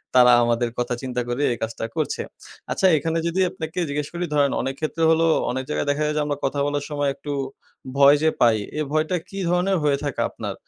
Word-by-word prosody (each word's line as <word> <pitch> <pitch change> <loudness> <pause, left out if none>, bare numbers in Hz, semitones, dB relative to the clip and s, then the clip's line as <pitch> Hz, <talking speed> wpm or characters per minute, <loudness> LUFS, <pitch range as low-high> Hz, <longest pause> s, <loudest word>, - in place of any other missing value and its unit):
তারা 125 -1 +7
আমাদের 120 0 +1
কথা 120 0 -1
চিন্তা 125 -2 -2
করে 120 +3 -2
এই 120 - -2
কাজটা 115 0 -4
করছে। - - -1 0.5
আচ্ছা 190 - +3
এখানে 160 +3 -1
যদি 170 +3 -1
আপনাকে 160 +2 -6
জিজ্ঞেস 145 0 -2
করি 175 +1 -2
ধরেন 145 -2 +3
অনেক 135 0 -3
ক্ষেত্রে 160 +1 -2
হলো 160 0 +3 0.3
অনেক 130 +1 -3
জায়গায় 150 - -1
দেখা 145 +1 0
যায়, 150 - 0
যে - - +2
আমরা 145 -1 -2
কথা 140 +1 -1
বলার 145 0 -2
সময় 145 -1 0
একটু 145 - -7 0.7
ভয় 140 +1 +7
যে 160 - +5
পাই। 115 -2 +5 0.2
এই 155 - 0
ভয়টা 155 +3 +1
কি 195 - -6
ধরনের 180 +2 +2
হয়ে 145 -2 +2
থাকে 145 -3 -2
আপনার? - - -6
145 Hz, 215 wpm, -23 LUFS, 130-160 Hz, 0.7 s, তারা